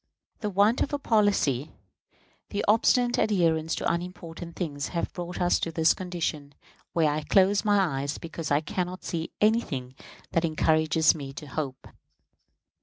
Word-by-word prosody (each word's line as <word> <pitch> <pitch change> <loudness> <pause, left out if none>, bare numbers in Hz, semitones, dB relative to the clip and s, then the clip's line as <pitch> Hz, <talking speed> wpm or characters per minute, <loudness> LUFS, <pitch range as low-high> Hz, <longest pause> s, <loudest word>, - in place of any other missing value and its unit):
The 210 - -2
want 205 +5 +3
of 285 - -1
a - - +2
policy, 205 - +1 0.8
the 205 - -2
obstinate 240 +3 +3
adherence 165 -6 +2
to - - 0
unimportant 170 -1 -6
things, 145 -5 -3
have 170 - -3
brought 175 0 -6
us 175 0 +2
to - - -2
a 160 0 -3
condition 165 -6 -4 0.4
where 160 -3 +3
I 150 +1 -1
close 195 +4 +3
my 195 -10 +2
eyes, 140 +1 -3
because 165 -1 -6
I 145 +1 +3
can 175 +3 -2
not 185 +1 -8
see 165 -1 -3
anything 180 - +1 0.4
that 165 - +1
encourages 155 0 +3
me 140 -3 -7
to 150 - -8
hope. 140 -2 -5
170 Hz, 155 wpm, -27 LUFS, 155-195 Hz, 0.8 s, want